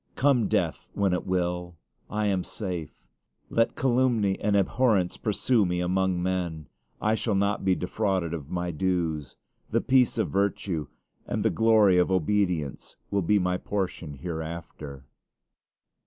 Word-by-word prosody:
Come 125 -6 +3
death - - -1
when 100 -2 +2
it 90 - -2
will, 90 -1 -1 0.3
I 105 0 -1
am 95 -3 +1
safe. 90 -7 -4 0.6
Let 115 0 +2
calumny 120 -6 +2
and 105 0 +1
abhorrence 100 -3 +2
pursue 110 +2 +1
me 90 -1 0
among 90 0 +1
men; 85 -5 -2 0.3
I 110 - +1
shall 110 -1 0
not 100 +1 +1
be 95 -1 +3
defrauded 95 -3 -1
of 75 -4 -6
my 90 -1 -2
dues. 80 -4 -1 0.3
The - - +2
peace 130 -2 +3
of - - 0
virtue 95 -5 -1 0.4
and - - -2
the - - +4
glory 110 -5 +5
of 90 - +2
obedience 90 -5 0 0.2
will 100 - +2
be 105 +4 +3
my 90 -1 +1
portion 90 -7 -3
hereafter. 80 -4 -6
95 Hz, 140 wpm, -27 LUFS, 85-105 Hz, 0.6 s, glory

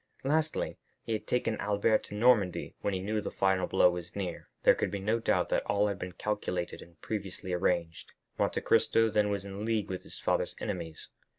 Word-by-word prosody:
Lastly, 155 +3 0 0.2
he 115 - -2
had 110 - -3
taken 115 -3 0
Albert 105 +2 +2
to 105 - -8
Normandy 105 -5 +3
when 100 - 0
he - - -1
knew 105 +3 -1
the - - -4
final 95 -1 +1
blow 90 - +5
was 90 0 -7
near. 95 -4 -4
There - - +7
could - - -1
be 100 - -3
no 110 +4 0
doubt 115 - +1
that - - +2
all 105 0 +2
had 100 -1 -4
been 90 -1 -5
calculated 90 -4 -3
and 85 -2 -16
previously 95 -3 -4
arranged; 85 -3 -1 0.3
Monte - - +1
Cristo 115 -1 +3
then 105 0 +2
was 100 -1 -2
in 100 +1 -6
league 110 -2 0
with 90 - -3
his - - -9
father's - - 0
enemies. 80 -1 -5
100 Hz, 200 wpm, -30 LUFS, 90-110 Hz, 0.3 s, There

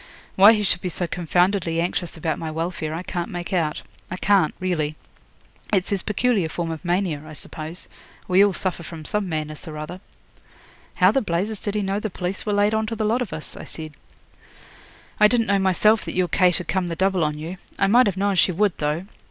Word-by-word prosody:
Why 200 +4 +8
he 210 -2 0
should 190 -3 +1
be 180 - -2
so 175 +1 -2
confoundedly 175 0 +1
anxious 175 0 -2
about 160 0 -2
my 160 - -4
welfare 160 0 -3
I 165 +3 -4
can't 175 -2 -3
make 175 0 -5
out 160 -4 0 0.3
I 185 - -4
can't, 195 -5 +3
really. 160 -5 -1 0.8
It's 190 -2 +1
his 200 -2 +1
peculiar 210 -4 +1
form 165 0 -3
of 160 +1 -6
mania, 175 -4 0
I 155 0 -10
suppose. 155 +3 -7 0.4
We 185 +2 +5
all 205 - +4
suffer 185 -1 -2
from 160 -1 -9
some 210 +1 +1
madness 155 -1 -4
or 155 -1 -6
other.' 165 +5 -7 0.9
'How 185 +1 +5
the 270 - +2
blazes 200 +2 -2
did 205 0 -3
he 210 - 0
know 195 +1 -1
the 215 - -3
police 185 +3 -4
were 210 - +1
laid 205 +1 +3
on 220 0 0
to 225 - -3
the 220 -1 -1
lot 230 +4 +1
of 235 - -3
us?' 155 - -6
I - - -8
said. 155 -2 -8 1.3
'I 210 - +8
didn't 230 0 +2
know 200 -1 +2
myself 205 +4 +3
that - - -5
your 180 -1 +2
Kate 180 -2 +3
had 180 - -6
come 190 -2 0
the 170 - -3
double 190 0 +1
on 150 -1 -1
you. 165 +5 -6 0.2
I - - +3
might 240 +5 +5
have 195 -2 -1
known 200 +1 +1
she 185 - +4
would, 200 +2 +1
though. 150 +4 -1
180 Hz, 220 wpm, -23 LUFS, 165-200 Hz, 1.3 s, Why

